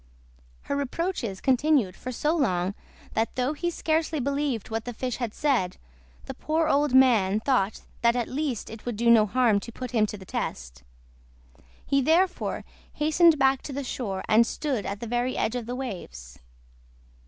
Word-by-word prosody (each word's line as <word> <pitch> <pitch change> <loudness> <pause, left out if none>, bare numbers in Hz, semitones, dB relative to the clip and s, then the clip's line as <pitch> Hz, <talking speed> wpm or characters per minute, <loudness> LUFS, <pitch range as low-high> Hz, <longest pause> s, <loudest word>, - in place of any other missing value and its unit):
Her 280 - -2
reproaches 280 - -3
continued 260 - +2
for 255 - -6
so 300 +6 0
long 185 - 0 0.4
that 225 +1 -1
though 255 +3 0
he 345 +3 -2
scarcely 320 -2 -1
believed 275 -5 -2
what 225 0 -2
the 245 -2 -6
fish 250 0 -3
had 240 -4 -3
said, 245 -10 0 0.5
the - - -6
poor 315 +1 0
old 290 -1 +2
man 220 -7 +5
thought 220 -5 0 0.2
that 235 0 +4
at 240 -2 -1
least 270 -6 -3
it 225 -1 -10
would 240 -2 -3
do 235 +2 +3
no 220 -2 +6
harm 230 -2 +3
to 235 - -9
put 250 0 -7
him 215 -3 +2
to 210 - -6
the 190 - -12
test. - - -5 1.0
He 275 0 +2
therefore 335 +7 +1 0.3
hastened 315 +2 +4
back 270 -1 +3
to 285 - -7
the 280 +1 -3
shore, 205 -7 -4
and 225 +1 +5
stood 275 -9 -2
at 200 +1 -5
the - - -4
very 245 +2 -1
edge 225 - 0
of 240 -2 -4
the 245 - -3
waves. 120 - -7
250 Hz, 175 wpm, -26 LUFS, 215-280 Hz, 1.0 s, no